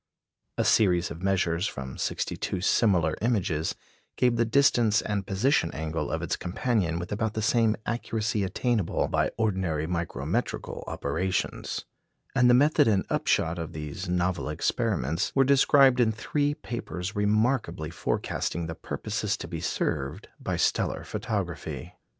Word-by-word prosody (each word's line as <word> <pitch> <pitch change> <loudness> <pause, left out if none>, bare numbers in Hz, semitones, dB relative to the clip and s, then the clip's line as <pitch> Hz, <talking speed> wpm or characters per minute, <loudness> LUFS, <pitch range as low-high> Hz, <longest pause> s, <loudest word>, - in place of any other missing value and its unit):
A - - +1
series 90 -5 +3
of 85 +1 -7
measures 90 -1 +1
from 65 -1 -6
sixty - - -2
two - - -3
similar 90 -4 +3
images 100 -9 0 0.4
gave 125 -1 +3
the 115 0 +2
distance 115 -4 +3
and 100 -2 -2
position 100 - +2
angle 80 +1 -3
of - - -2
its - - 0
companion 90 -2 -1
with 90 +1 -5
about 110 +1 -1
the 110 - -1
same 115 0 +3
accuracy 110 -3 -1
attainable 105 +1 0
by - - +1
ordinary 95 -8 0
micrometrical 85 0 -3
operations; 90 +6 -2 0.5
and 125 -2 +4
the 120 - +7
method 145 +2 +4
and 100 -4 +2
upshot 85 +1 +1
of 80 -1 -5
these 75 +4 -5
novel 90 -2 0
experiments 85 - 0
were 135 - +6
described 135 -1 +5
in 115 -2 +4
three 145 +6 -1
papers 100 -6 -5
remarkably 105 - +1
forecasting 85 +1 -2
the 80 - -4
purposes 80 - -3
to - - -7
be - - -5
served 75 +7 -2
by - - -2
stellar - - +1
photography. - - -4
100 Hz, 140 wpm, -27 LUFS, 85-115 Hz, 0.5 s, the